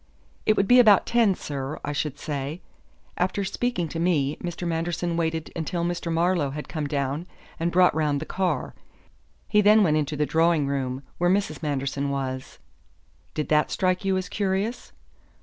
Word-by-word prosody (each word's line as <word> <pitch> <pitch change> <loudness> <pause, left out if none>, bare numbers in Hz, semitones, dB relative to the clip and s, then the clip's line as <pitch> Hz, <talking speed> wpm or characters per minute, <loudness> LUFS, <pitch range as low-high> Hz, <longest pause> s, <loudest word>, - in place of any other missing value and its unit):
"It 215 - +4
would 195 - +2
be 250 +3 +7
about 215 -5 +6
ten, 230 -5 +3
sir, 140 -2 -5
I 145 - -2
should 145 -1 -2
say. 145 +3 -4 0.5
After 185 +2 0
speaking 215 -2 -1
to 165 - -4
me, 155 -5 +1
Mr. 175 0 -5
Manderson 170 +1 -1
waited 160 -1 -2
until 170 +1 -2
Mr. 175 -1 -2
Marlowe 170 -3 +1
had 150 +2 -6
come 155 -3 -3
down 140 +3 -2 0.3
and 170 +1 0
brought 180 +1 +5
round 150 -2 +1
the 155 - -5
car. 180 -7 -1 0.7
He 210 - +4
then 210 +1 +6
went 155 -4 +3
into 150 0 -1
the 150 - +2
drawing 165 -1 +2
room, 135 -1 -2 0.2
where 175 0 +3
Mrs. 190 -5 0
Manderson 140 -1 -2
was." 130 -2 -4 0.8
"Did 150 - -2
that 150 0 +3
strike 185 0 0
you 190 -1 +1
as 185 -1 -3
curious?" 200 +5 -2
165 Hz, 170 wpm, -25 LUFS, 145-185 Hz, 0.8 s, be